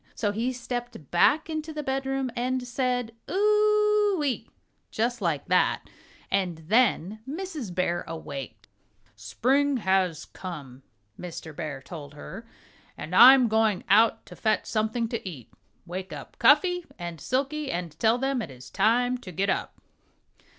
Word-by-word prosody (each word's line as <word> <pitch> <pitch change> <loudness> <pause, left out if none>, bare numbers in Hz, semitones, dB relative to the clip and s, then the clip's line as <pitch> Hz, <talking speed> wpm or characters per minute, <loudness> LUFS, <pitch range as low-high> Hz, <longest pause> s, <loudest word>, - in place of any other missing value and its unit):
So 205 -3 0
he 230 +5 -1
stepped 245 - -6
back 295 - +4
into 315 0 -4
the 305 -1 -5
bedroom 270 -1 -1
and 255 +1 -1
said 245 -2 -1 0.2
"Ou 420 -2 +3
e - - +1
e 265 - +3
ee!" - - -12 0.4
Just 235 +1 -1
like 165 -7 -1
that. - - +1 0.4
And 185 -4 0
then 215 -3 +2
Mrs. 310 - -5
Bear 175 -1 0
awaked. 145 -5 -7 0.5
"Spring 255 - +1
has 190 -6 +1
come," 145 -8 -9 0.4
Mr. 165 -3 -8
Bear 145 -5 -5
told 145 -2 -9
her, 200 +9 -9 0.5
"and 155 +5 -5
I 255 +6 +11
am 255 -3 +3
going 220 -3 +2
out 220 +2 +4
to - - -12
fetch 220 - 0
something 220 +2 -1
to 230 - -3
eat. 135 -10 -11 0.3
Wake 185 +2 -6
up - - -9
Cuffy 325 +8 +4
and 170 -3 -6
Silkie 275 +2 -1
and 175 -2 -3
tell 225 +6 +3
them 270 0 0
that 195 - -4
it 130 - -11
is 125 0 -13
time 245 +2 +2
to 190 -7 -9
get 195 +4 0
up." - - -3
230 Hz, 155 wpm, -27 LUFS, 175-270 Hz, 0.5 s, I